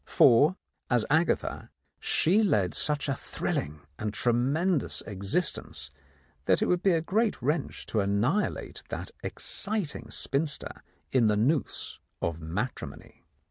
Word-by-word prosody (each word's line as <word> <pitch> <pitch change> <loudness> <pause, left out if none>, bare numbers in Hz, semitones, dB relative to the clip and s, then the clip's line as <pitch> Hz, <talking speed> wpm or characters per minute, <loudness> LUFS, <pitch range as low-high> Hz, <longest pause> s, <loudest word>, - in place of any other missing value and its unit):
For 145 +10 +6 0.3
as 120 -3 +3
Agatha 160 +3 +1 0.3
she 190 +7 +3
led 105 - +2
such 150 -1 0
a 140 - +1
thrilling 75 - -3 0.2
and 105 0 -2
tremendous 135 - +1
existence 100 - -2 0.5
that - - +4
it - - +2
would 180 -1 +2
be 195 -2 +4
a 165 - +2
great 215 +6 +1
wrench 145 +4 -1
to 110 - -1
annihilate 105 - 0
that - - -5
exciting 205 -7 -2
spinster 145 +1 -2 0.3
in 125 -4 +4
the 105 -1 +3
noose 135 +8 0 0.2
of 85 -1 -2
matrimony. 100 +10 -5
135 Hz, 125 wpm, -28 LUFS, 105-170 Hz, 0.5 s, For